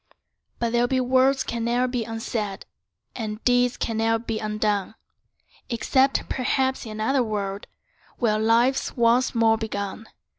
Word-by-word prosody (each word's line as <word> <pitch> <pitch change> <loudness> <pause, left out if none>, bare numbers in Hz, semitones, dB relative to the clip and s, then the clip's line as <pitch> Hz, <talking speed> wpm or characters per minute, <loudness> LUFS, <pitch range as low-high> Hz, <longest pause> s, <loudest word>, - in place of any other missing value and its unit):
But 235 -1 -1
there 240 +1 +2
be 260 +1 +1
words 260 +1 +3
can 235 -1 -3
ne'er 240 +2 +1
be 245 -2 -2
unsaid, 225 -3 -4 0.5
And 215 -3 -4
deeds 245 0 +3
can 225 -2 -2
ne'er 225 0 +2
be 225 -1 -4
undone, 210 -1 -1 0.7
Except 265 +3 +1
perhaps 265 0 0
in 215 - -6
another 225 +5 +1
world, 205 -3 -3 0.5
Where 215 -3 +1
life's 235 +6 +2
once 240 +2 +3
more 225 -1 +3
begun. 215 0 -4
230 Hz, 140 wpm, -24 LUFS, 215-250 Hz, 0.7 s, words